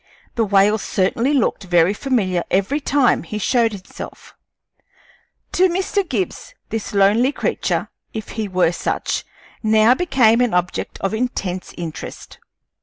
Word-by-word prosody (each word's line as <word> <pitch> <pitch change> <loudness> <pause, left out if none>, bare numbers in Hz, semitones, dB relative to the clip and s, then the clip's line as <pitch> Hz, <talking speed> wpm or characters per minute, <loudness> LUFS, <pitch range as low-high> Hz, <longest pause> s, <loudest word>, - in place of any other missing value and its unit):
The 230 - +1
whale 200 +2 +3
certainly 230 +8 0
looked 260 -7 +1
very 175 +1 +3
familiar 205 -8 0
every 200 +10 +1
time 280 -3 +2
he 210 +5 -6
showed 230 +2 +2
himself. 195 -2 -10 1.2
To 370 +1 +3
Mr. 380 +3 0
Gibbs 195 -8 -3
this 220 -2 -4
lonely 210 +7 +4
creature, - - -2 0.2
if 220 -2 -6
he 220 -2 -3
were 185 -3 +2
such, - - -2 0.4
now 220 +1 +5
became 250 -8 +3
an 245 -7 +1
object 180 0 -2
of 195 - -1
intense 200 -6 -3
interest. 165 -3 -7
215 Hz, 130 wpm, -20 LUFS, 190-250 Hz, 1.2 s, now